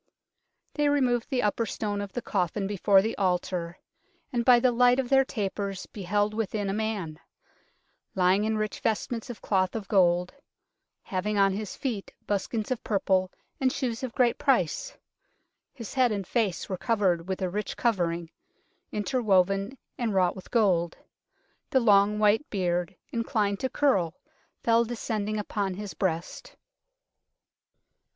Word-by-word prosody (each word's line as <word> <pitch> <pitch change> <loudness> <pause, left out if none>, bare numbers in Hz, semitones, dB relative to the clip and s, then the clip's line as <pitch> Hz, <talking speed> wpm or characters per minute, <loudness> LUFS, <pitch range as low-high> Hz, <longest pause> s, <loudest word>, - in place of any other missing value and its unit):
They 295 -1 +2
re 290 0 +3
moved 245 -3 +1
the 255 -3 0
upper 215 +2 0
stone 205 0 -3
of 200 -1 -6
the 245 - -4
coffin 195 +1 -1
before 195 0 +3
the 225 - -2
altar, 180 -2 -1 0.6
and 240 -1 +1
by 245 0 +7
the 250 +1 +3
light 245 +1 +4
of 255 -2 -1
their 270 -1 +5
tapers 200 -5 -3
beheld 205 +2 -1
within 215 -2 -2
a - - -2
man, 205 -8 -3 1.0
lying 185 +2 +3
in 220 0 0
rich 215 0 -2
vestments 225 +1 -2
of 240 - -8
cloth 185 -1 +1
of 215 -3 -4
gold, 180 -2 +3 0.7
having 205 +3 -2
on 195 -1 +4
his 205 0 -5
feet 230 -8 -4
buskins 210 +3 -2
of 250 - -2
purple 190 -3 +1 0.3
and 260 -1 +2
shoes 245 -5 -2
of 255 -3 -5
great 245 -2 +2
price; 275 - +1 0.7
his 230 -6 -9
head 255 -3 +3
and 200 -2 -2
face 210 -4 -1
were 185 -2 -4
covered 190 -7 +1
with 190 -1 -2
a 185 - -1
rich 210 +2 -3
covering, 170 -7 0 0.6
interwoven 200 -1 +1 0.2
and 225 -4 -1
wrought 180 -2 +3
with 190 - -11
gold. 180 -7 +2 0.7
The 270 - +3
long 210 -2 +4
white 215 +6 +3
beard, 180 -2 -1 0.2
in 230 -1 -1
clined 205 -4 0
to 260 - -1
curl, 190 - +1 0.5
fell 230 0 +4
descending 220 -2 -3
upon 200 -2 -2
his 205 0 -6
breast. 170 -2 -3
205 Hz, 150 wpm, -27 LUFS, 190-235 Hz, 1.0 s, by